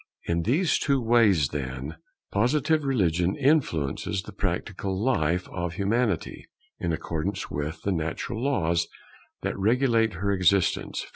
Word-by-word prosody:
In 85 Hz, 0 st, 0 dB
these 150 Hz, -, +2 dB
two 140 Hz, -2 st, +2 dB
ways, 110 Hz, -, +4 dB
then, 70 Hz, +2 st, -5 dB, 0.3 s
Positive 145 Hz, +8 st, +2 dB
religion 90 Hz, -, +1 dB
influences 105 Hz, -, +1 dB
the 105 Hz, -, -9 dB
practical 95 Hz, 0 st, -3 dB
life 90 Hz, -8 st, +1 dB
of 85 Hz, -2 st, -3 dB
Humanity, 105 Hz, -2 st, -1 dB, 0.3 s
in 85 Hz, -, -1 dB
accordance 80 Hz, +4 st, -3 dB
with 75 Hz, +3 st, -4 dB
the 100 Hz, -, 0 dB
natural 85 Hz, +7 st, -3 dB
laws 85 Hz, -11 st, +1 dB, 0.6 s
that -, -, -1 dB
regulate 115 Hz, 0 st, +2 dB
her 100 Hz, +4 st, -1 dB
existence. 95 Hz, 0 st, +1 dB
100 Hz, 125 wpm, -26 LUFS, 85-120 Hz, 0.6 s, ways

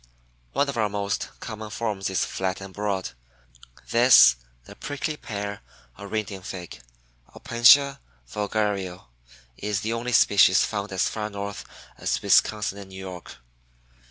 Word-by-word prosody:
One 145 Hz, -, +2 dB
of 140 Hz, -3 st, -4 dB
our 110 Hz, -2 st, +1 dB
most 100 Hz, 0 st, -2 dB
common 110 Hz, -2 st, -7 dB
forms 105 Hz, -3 st, -3 dB
is 95 Hz, -, 0 dB
flat 95 Hz, 0 st, -3 dB
and 95 Hz, -1 st, -10 dB
broad. 100 Hz, -2 st, -2 dB, 0.8 s
This, 120 Hz, -, +7 dB, 0.3 s
the -, -, -13 dB
Prickly 145 Hz, +2 st, -4 dB
Pear 100 Hz, -6 st, -6 dB, 0.3 s
or 100 Hz, +1 st, -8 dB
Indian 100 Hz, -3 st, -3 dB
Fig 90 Hz, -8 st, -8 dB, 0.5 s
(Opentia 135 Hz, +4 st, +5 dB, 0.3 s
Vulgario), 100 Hz, -, -2 dB, 0.5 s
is 105 Hz, -2 st, -2 dB
the 110 Hz, +2 st, -2 dB
only 120 Hz, +1 st, -3 dB
species 100 Hz, -4 st, +5 dB
found 100 Hz, -1 st, -3 dB
as 95 Hz, -1 st, +1 dB
far 105 Hz, -1 st, -4 dB
north 100 Hz, 0 st, -6 dB, 0.3 s
as -, -, -1 dB
Wisconsin 105 Hz, -2 st, +2 dB
and 100 Hz, -1 st, -11 dB
New 95 Hz, -, -11 dB
York. 95 Hz, -2 st, -9 dB
100 Hz, 135 wpm, -25 LUFS, 95-110 Hz, 0.8 s, This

